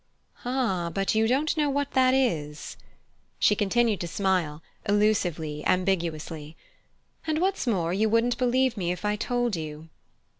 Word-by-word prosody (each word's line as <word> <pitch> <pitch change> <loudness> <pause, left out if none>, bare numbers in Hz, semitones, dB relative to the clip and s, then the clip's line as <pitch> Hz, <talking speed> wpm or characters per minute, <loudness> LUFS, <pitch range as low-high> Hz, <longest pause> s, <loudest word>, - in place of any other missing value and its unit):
"Ah, 235 -9 0
but 195 +3 0
you 220 0 +3
don't 280 +7 +1
know 300 -2 +1
what 285 0 -1
that 260 0 +4
is!" 155 - -1 0.6
She 210 - +4
continued 215 +1 +1
to 175 - -3
smile, 170 -4 -1 0.3
elusively, 175 -8 +1
ambiguously. 165 -4 -1 0.7
"And 310 -1 +1
what's 375 -5 0
more, 175 -7 +1
you 215 +3 +2
wouldn't 230 +2 +2
believe 255 0 +2
me 175 -3 -1
if 180 +3 -5
I 210 0 +1
told 245 0 -1
you." 155 0 -7
205 Hz, 145 wpm, -26 LUFS, 170-245 Hz, 0.7 s, that